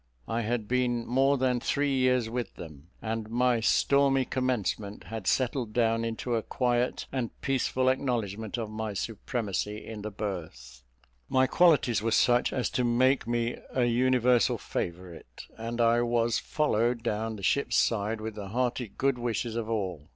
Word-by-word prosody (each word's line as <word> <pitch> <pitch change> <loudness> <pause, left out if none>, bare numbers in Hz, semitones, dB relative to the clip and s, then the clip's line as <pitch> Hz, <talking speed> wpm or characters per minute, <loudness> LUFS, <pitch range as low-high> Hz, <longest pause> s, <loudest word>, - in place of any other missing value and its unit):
I 115 +1 -1
had 115 -1 -2
been 120 -1 0
more 135 +3 +3
than 125 -1 +1
three 140 +3 0
years 125 -2 +2
with 120 -2 -4
them; 75 -2 -11 0.2
and 110 -1 -3
my 120 0 +2
stormy 135 +3 +3
commencement 110 -6 -2
had 110 -4 -6
settled 125 -3 0
down 115 -1 +2
into 115 +2 -3
a 115 - +1
quiet 125 +1 0
and 125 -4 -4
peaceful 130 -1 0
acknowledgment 115 -5 -1
of 110 -2 -4
my 110 -1 -4
supremacy 105 -1 -3
in 110 -2 -7
the 105 - -4
berth; 80 - -6 0.5
my 130 0 +4
qualities 140 -7 +3
were 115 - 0
such 120 +2 +3
as 125 - -1
to 125 - 0
make 125 +1 +2
me 120 0 -1 0.2
a 125 -2 +3
universal 125 0 +3
favourite, 85 -8 -6
and 115 +1 -5
I 115 0 +4
was 120 -1 +1
followed 120 -5 0
down 110 -1 -2
the 100 - -10
ship's 140 +8 +1
side 110 0 +1
with 110 0 -4
the 105 -2 -7
hearty 125 +2 -1
good 135 -2 +1
wishes 120 -1 -2
of 115 -1 -3
all. 95 -9 -3
115 Hz, 160 wpm, -28 LUFS, 110-125 Hz, 0.5 s, my